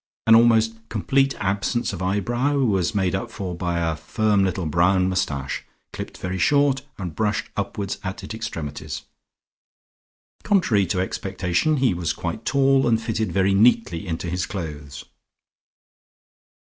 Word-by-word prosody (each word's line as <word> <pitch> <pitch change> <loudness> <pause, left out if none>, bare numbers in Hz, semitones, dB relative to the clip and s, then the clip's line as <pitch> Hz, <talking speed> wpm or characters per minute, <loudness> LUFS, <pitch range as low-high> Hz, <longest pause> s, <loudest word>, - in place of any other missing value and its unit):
An 115 - +6
almost 115 -1 +5 0.2
complete 135 +5 +1
absence 100 +4 -1
of 95 - -6
eyebrow 120 +9 0
was 105 -6 +1
made 95 -2 +1
up 95 - -2
for 95 -3 -5
by 85 0 -2
a 80 -1 0
firm 105 +5 +1
little 95 -1 -1
brown 90 +4 +3
moustache 70 -8 -2 0.3
clipped - - -7
very 90 +1 -4
short, 140 +4 +3 0.2
and 90 -5 -5
brushed 105 -1 -1
upwards 100 -1 -3
at 95 +1 -5
its - - -6
extremities. 80 -11 -5 1.4
Contrary 125 - +2
to 90 - -1
expectation 95 - -1
he 130 -6 +2
was 85 -2 -1
quite 90 +6 -5
tall 135 -1 +3
and 115 -2 +3
fitted 115 -1 -2
very 95 0 +2
neatly 105 -3 +3
into 80 +1 -3
his 90 +2 -2
clothes. 75 -7 -6
100 Hz, 140 wpm, -23 LUFS, 90-115 Hz, 1.4 s, An